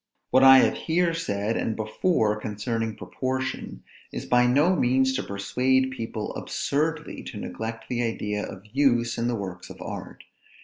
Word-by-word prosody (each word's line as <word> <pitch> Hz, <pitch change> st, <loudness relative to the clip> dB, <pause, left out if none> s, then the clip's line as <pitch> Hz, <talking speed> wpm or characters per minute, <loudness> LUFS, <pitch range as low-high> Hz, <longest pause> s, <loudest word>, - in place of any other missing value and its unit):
What 130 Hz, +1 st, +5 dB
I 135 Hz, 0 st, +10 dB
have -, -, +3 dB
here 170 Hz, +1 st, +1 dB
said 110 Hz, -9 st, -1 dB
and 110 Hz, -, -1 dB
before 110 Hz, -, +1 dB
concerning 110 Hz, +1 st, -3 dB
proportion, 130 Hz, -, -4 dB, 0.3 s
is -, -, -5 dB
by 125 Hz, 0 st, +4 dB
no 150 Hz, +9 st, +4 dB
means 130 Hz, -1 st, +2 dB
to 135 Hz, -, -1 dB
persuade 130 Hz, +6 st, +1 dB
people 115 Hz, -4 st, -5 dB
absurdly 155 Hz, +2 st, -2 dB
to -, -, -7 dB
neglect 110 Hz, 0 st, -5 dB
the 120 Hz, -1 st, -1 dB
idea 105 Hz, -3 st, -2 dB
of 95 Hz, +1 st, -8 dB
use 120 Hz, -1 st, +1 dB
in 115 Hz, -, 0 dB
the 120 Hz, -, 0 dB
works 95 Hz, -4 st, -6 dB
of -, -, -11 dB
art. -, -, -7 dB
120 Hz, 160 wpm, -26 LUFS, 110-130 Hz, 0.3 s, I